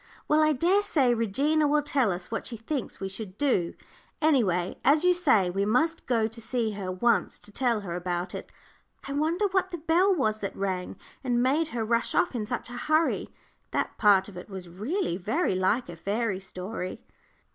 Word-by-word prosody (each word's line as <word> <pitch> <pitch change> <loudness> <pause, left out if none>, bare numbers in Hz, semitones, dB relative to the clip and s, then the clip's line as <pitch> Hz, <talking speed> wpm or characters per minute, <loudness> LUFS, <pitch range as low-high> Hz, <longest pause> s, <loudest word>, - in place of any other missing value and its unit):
"Well, 305 +1 +4
I 310 0 +4
dare 355 +9 +3
say 270 -11 +2
Regina 280 +8 +2
will 295 0 +2
tell 270 -7 +2
us 180 +2 -5
what 225 - -3
she 235 - -4
thinks 250 +4 -4
we 195 - -3
should 195 0 -7
do. 220 -12 +1 0.4
Any 305 -5 +4
way, 180 -2 -1
as 300 +4 +4
you 360 0 +5
say, 220 - +3
we 195 +2 0
must 315 +11 +1
go 230 -3 +2
to 225 +1 -5
see 230 -1 -1
her 195 -3 -4
once 235 +6 +1
to 210 - -11
tell 235 -1 0
her 175 -4 -5
about 175 0 -3
it. - - -7 0.6
I 275 - -4
wonder 320 +7 +1
what 375 0 +1
the 350 - -5
bell 340 +5 +3
was 215 - +1
that 195 - -4
rang, 190 -2 -3 0.3
and 245 -2 +1
made 295 +5 +2
her 235 -7 -3
rush 230 +1 +1
off 355 - +2
in 220 -4 -3
such 245 - -3
a 245 +3 -5
hurry. 315 +1 +2 0.4
That - - -2
part 200 -3 +5
of 200 -3 -11
it 180 - -9
was 190 -2 -7
really 210 - -2
very 220 - 0
like 190 +7 +1
a 170 - -8
fairy 200 +3 -1
story." 185 0 -6
230 Hz, 200 wpm, -27 LUFS, 195-300 Hz, 0.6 s, you